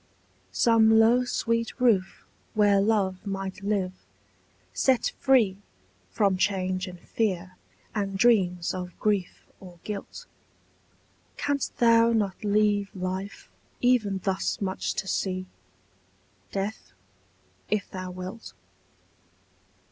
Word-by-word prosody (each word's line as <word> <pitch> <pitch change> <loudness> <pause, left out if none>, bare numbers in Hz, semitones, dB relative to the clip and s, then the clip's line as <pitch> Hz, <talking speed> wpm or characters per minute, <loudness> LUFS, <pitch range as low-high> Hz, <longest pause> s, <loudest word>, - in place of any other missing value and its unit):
Some 225 -1 +5
low 235 +3 +5
sweet 230 0 -1
roof 210 -7 +2 0.3
where 205 -2 +4
love 195 -3 +1
might 195 -1 -5
live, 195 -2 -1 0.8
set 260 -3 +2
free 235 -8 +3 0.5
From 195 - +1
change 185 -1 0
and 180 -1 -9
fear 185 -3 -2 0.4
and 195 -2 -2
dreams 185 -6 +3
of 180 -1 -6
grief 205 -4 -1
or 180 -2 -13
guilt; 205 -2 -7 1.1
Canst 285 -1 -2
thou 230 0 +5
not 205 -4 -1
leave 205 -1 +2
life 190 +2 -5 0.3
even 235 -6 +2
thus 190 -1 -1
much 190 -2 -2
to 190 - -3
see, 185 -1 -2 1.1
Death, 200 +2 -4 0.8
if 210 -1 0
thou 185 -1 -5
wilt? 185 +5 -8
200 Hz, 100 wpm, -26 LUFS, 185-225 Hz, 1.1 s, Some